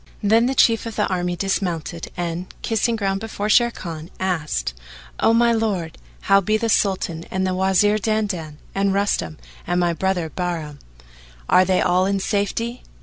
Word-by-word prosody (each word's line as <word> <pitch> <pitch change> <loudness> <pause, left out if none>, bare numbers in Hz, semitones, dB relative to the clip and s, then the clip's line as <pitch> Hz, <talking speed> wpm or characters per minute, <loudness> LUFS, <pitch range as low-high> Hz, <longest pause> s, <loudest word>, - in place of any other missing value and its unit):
Then 225 +3 +4
the 265 - -1
Chief 230 -2 +3
of 225 - -6
the 210 - +1
army 180 -1 -1
dismounted 175 -3 -2
and, 175 +1 -3 0.2
kissing 230 +1 +1
ground 195 -3 -1
before 215 -1 -4
Sharrkan, 180 -9 +1
asked, 155 - -1 0.5
"O - - +4
my 235 +1 +4
lord, 205 -8 -1 0.2
how 195 0 +4
be 215 +3 +1
the 230 +1 -1
Sultan 185 -6 +1
and 190 0 -1
the 185 - 0
Wazir 190 +3 +3
Dandan 200 -8 -2 0.2
and 195 0 +1
Rustam 145 - 0 0.3
and 175 +1 +1
my 175 -1 +2
brother 180 0 -1
Bahram; 165 -5 -4 0.7
are 185 - +5
they 185 0 +2
all 180 +1 +2
in 200 0 0
safety?" 225 +5 -2
190 Hz, 160 wpm, -22 LUFS, 175-215 Hz, 0.7 s, are